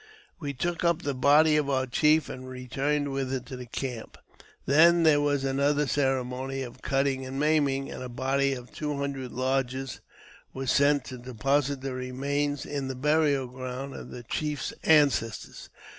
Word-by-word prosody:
We 140 -1 -4
took 175 +6 -2
up 170 0 +2
the 145 - -1
body 150 +4 +5
of 145 -2 0
our 130 -1 +1
chief 150 +5 +3
and 130 0 -8
returned 135 +3 -2
with 135 -1 -2
it 130 -1 -3
to 130 - -10
i - - -5
the 125 - -7
camp. 125 -2 -5 0.5
Then 170 +4 +6
there 150 -2 +5
was 145 -2 +1
another 140 +2 +1
ceremony 135 -1 -1
of 125 0 -10
cutting 135 -1 0
and; 130 +1 -5
maiming, 145 -3 +1
and - - -7
a 125 - -5
body 135 +2 0
of 125 -1 -8
two 150 -1 -3
hundred 140 -2 -4
lodges 130 0 -2 0.5
was 135 -1 -1
sent 140 -1 +3
to 130 - -8
deposit 135 +3 0
the 135 -1 -4
remains 140 +3 -2
in 140 -2 -3
the 130 - -4
burial 145 0 +2
ground 130 +2 -6
of - - -9
the 120 - -8
chief's 150 +4 -3
ances 145 -8 +3
tors. - - -12
135 Hz, 175 wpm, -27 LUFS, 130-145 Hz, 0.5 s, Then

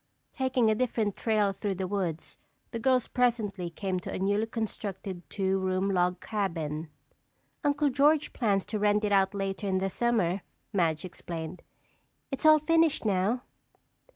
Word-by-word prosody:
Taking 260 -3 +1
a 220 - +4
different 220 -3 0
trail 215 -3 +2
through 195 0 -3
the 190 +1 -2
woods, 180 -5 -3 0.3
the 230 - -3
girls 255 0 +2
presently 215 -8 0
came 185 +1 -2
to - - -7
a - - -3
newly 205 +3 +1
constructed 200 -5 -4
two 195 -1 0
room 190 +1 0
log 180 -1 +1
cabin. 165 -7 -3 0.7
"Uncle 290 0 +2
George 290 +3 +3
plans 200 -6 +1
to 210 0 -3
rent 210 +1 +3
it 210 - 0
out 195 0 +3
later 195 0 -2
in 190 -1 +1
the 190 0 -1
summer," 205 -6 +1 0.3
Madge 165 -4 +1
explained. 170 -1 -6 0.7
"It's 270 +3 +1
all 310 0 +9
finished 325 -2 +2
now." 210 +5 +1
200 Hz, 155 wpm, -29 LUFS, 185-235 Hz, 0.7 s, all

